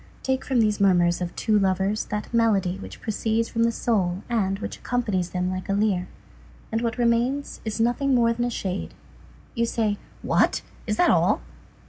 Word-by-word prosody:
Take 265 0 0
from 255 -4 +2
those 210 -2 +1
murmurs 175 -3 +3
of 175 -1 -4
two 215 -2 +2
lovers 195 +2 +1
that 210 +2 -5
melody 200 -5 +2
which - - -10
proceeds 225 +1 -1
from 230 - -1
the 230 - +2
soul 195 -6 0
and 195 -5 0
which - - -6
accompanies 210 -8 -1
them 180 0 -1
like 185 0 -5
a - - +2
lyre, 200 -3 +1 0.6
and 225 +1 0
what 230 -1 -1
remains 240 +4 0
is 220 0 -3
nothing 245 +4 +2
more 230 -1 +4
than 240 +1 -1
a - - 0
shade; 190 -5 -4 0.6
you 235 -2 0
say: 215 -3 0 0.2
"What! - - +2 0.2
is 210 -1 0
that 355 - +5
all!" - - +3
215 Hz, 180 wpm, -25 LUFS, 190-235 Hz, 0.6 s, that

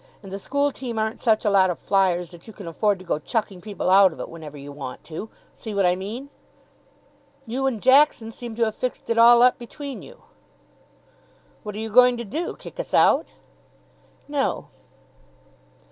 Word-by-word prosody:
And 195 - -10
the 195 - -4
school 285 +6 0
team 245 -4 -6
aren't 220 +1 -2
such 220 -3 +2
a - - +4
lot 190 -2 +4
of 175 - -2
flyers 180 -3 +1
that 175 +3 -14
you 220 - -10
can 195 -4 -10
afford 200 +4 0
to 185 - -13
go 160 - -1
chucking 200 +1 -3
people 205 -2 -5
out 195 -1 +7
of - - -13
it - - -6
whenever 155 -3 -10
you 140 +1 -9
want 135 -3 -8
to. 170 +7 -7 0.2
See 220 -3 -8
what 195 -1 +2
I 180 0 +3
mean?" 225 +9 -7 1.1
"You 260 +3 -2
and 240 -5 -2
Jackson 260 -2 +4
seem 235 0 -8
to 230 0 +2
have 220 - -2
fixed 250 0 -4
it 230 - +2
all 235 +1 +8
up 250 0 +4
between 255 -1 -8
you." - - -15 1.4
"What 210 -1 -7
are - - -6
you 220 0 -5
going 250 +2 +6
to 235 - -5
do? 310 - -4
Kick - - -12
us - - -3
out?" - - +3 0.9
"No." 285 -2 -2
220 Hz, 190 wpm, -23 LUFS, 190-245 Hz, 1.4 s, all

